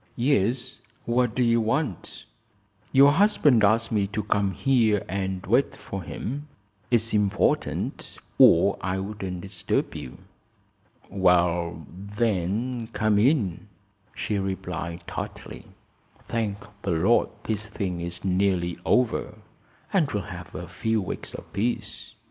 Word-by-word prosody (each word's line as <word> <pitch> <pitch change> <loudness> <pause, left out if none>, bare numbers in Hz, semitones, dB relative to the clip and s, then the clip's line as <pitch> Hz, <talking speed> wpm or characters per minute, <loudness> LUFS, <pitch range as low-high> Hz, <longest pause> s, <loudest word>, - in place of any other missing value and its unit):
"Yes. 125 0 0 0.3
What 120 -1 +1
do 125 - +2
you 115 -1 +3
want?" 115 - -2 0.7
"Your 140 +2 +7
husband 150 - +4
asked 110 +3 +3
me 105 -3 +1
to 105 +1 -3
come 100 -2 +1
here 110 -3 +2
and 95 -1 -3
wait - - +2
for - - -6
him. 145 +6 -5 0.4
It's 115 -2 +2
important 105 -1 0 0.2
or - - +6
I 95 +1 -1
wouldn't 95 -2 -5
disturb 95 -1 -2
you." 65 - -8 0.9
"Well, 90 -3 +2
then; 105 +4 -2
come 110 -1 +2
in," 110 - +1 0.5
she 105 -2 -1
replied, 90 -3 -4
tartly. - - -7 0.6
"Thank 110 -3 -2 0.2
the 95 - -1
Lord 95 +9 +3
this 110 0 -3
thing 95 -4 -3
is 85 +2 -6
nearly 90 -2 +1
over, 125 -2 +1 0.6
and 175 -7 +2
we'll 105 -2 -2
have 90 -1 -10
a - - -6
few 110 0 -1
weeks 95 - -5
of - - -11
peace." 115 +5 -3
105 Hz, 125 wpm, -25 LUFS, 95-115 Hz, 0.9 s, Your